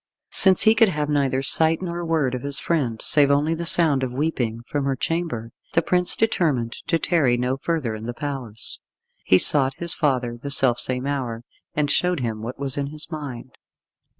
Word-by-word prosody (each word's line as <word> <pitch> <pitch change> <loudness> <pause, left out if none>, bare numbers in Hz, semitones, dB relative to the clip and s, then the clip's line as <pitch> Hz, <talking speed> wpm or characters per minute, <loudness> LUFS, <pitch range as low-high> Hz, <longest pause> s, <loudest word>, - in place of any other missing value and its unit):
Since 190 -2 +6
he 220 - +6
could 225 -1 +4
have 150 -4 -2
neither 135 -2 0
sight 160 +4 +2
nor 175 -1 -5
word 160 -6 0
of 125 - -4
his 140 +1 -2
friend, 130 -10 -1
save 145 -2 +4
only 145 +3 +1
the 170 +1 -4
sound 155 -6 +3
of 130 -2 -3
weeping 125 -5 -2
from 145 +1 -3
her 135 -1 0
chamber, 155 -7 -3 0.2
the 165 - +2
prince 180 +1 +2
determined 150 - 0 0.2
to 165 - +2
tarry 145 -8 +1
no 125 +2 -1
further 140 -4 -3
in 110 +1 -7
the 120 - -4
palace. 130 -7 -5 0.5
He 95 - +5
sought 135 +5 +4
his 170 +2 -1
father 125 -5 -1
the 140 - -5
self 130 -3 +3
same 130 0 +2
hour, 125 -5 -4 0.3
and 145 -1 0
showed 180 -4 0
him 110 -3 -4
what 120 +3 -7
was 135 -1 -3
in 140 - -2
his 155 +3 -8
mind. 130 -5 -7
140 Hz, 195 wpm, -22 LUFS, 125-160 Hz, 0.5 s, Since